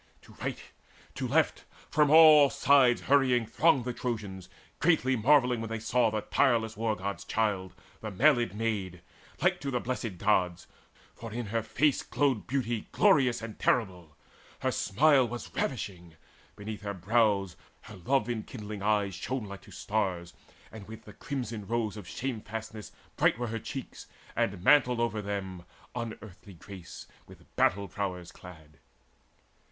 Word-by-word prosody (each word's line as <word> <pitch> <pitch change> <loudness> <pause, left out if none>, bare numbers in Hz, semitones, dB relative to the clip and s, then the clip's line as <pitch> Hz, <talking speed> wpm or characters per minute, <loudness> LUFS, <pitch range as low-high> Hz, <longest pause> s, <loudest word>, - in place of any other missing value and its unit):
To - - -16
right, - - -3 0.6
to - - -3
left, - - +1 0.3
from 150 -1 +3
all 155 -2 +8
sides 135 -4 +4
hurrying 130 -4 +3
thronged 135 0 +2
The 125 - -2
Trojans, 100 -7 -5 0.3
greatly 150 -6 +3
marvelling, 125 0 +3
when 115 - -5
they 115 - -3
saw 115 +1 +2
The 110 0 -2
tireless 115 -5 +1
War 110 0 -1
god's 100 +1 -5
child, 100 -4 -1 0.2
the 110 - -5
mailed 120 0 +2
maid, 100 -6 -3 0.4
Like - - +2
to 140 - -3
the 125 -2 -1
Blessed 120 -6 -4
Gods; 90 -3 +1 0.5
for 115 -1 -9
in 120 +2 -4
her 115 - +1
face 140 +6 +1
Glowed 135 -7 0
beauty 120 -3 -2
glorious 125 -5 +3
and 115 -2 -8
terrible. 90 -10 -1 0.4
Her - - +1
smile 135 +3 +3
was 120 +1 -7
ravishing: 90 - -4 0.4
beneath 105 +1 -7
her 100 -1 -4
brows 100 -2 +1 0.3
Her - - -12
love 130 +10 0
enkindling 110 -3 -6
eyes 105 -1 +1
shone 115 +6 -4
like 100 -1 -9
to - - -16
stars, 90 -5 -2 0.4
And 110 -3 -11
with 110 0 -10
the 105 - -12
crimson 115 -8 -5
rose 115 -2 -1
of 105 -5 -9
shamefastness 110 -3 -6 0.3
Bright - - +3
were 120 -1 -3
her 115 +1 -3
cheeks, 130 +4 -8 0.3
and 95 -2 -1
mantled 125 -3 +4
over 115 -2 -1
them 95 -3 -5 0.3
Unearthly 105 -4 -8
grace 90 0 -11 0.2
with - - -18
battle 100 +2 +2
prowess 90 -4 -5
clad. 80 -4 -14
110 Hz, 150 wpm, -29 LUFS, 100-125 Hz, 0.6 s, all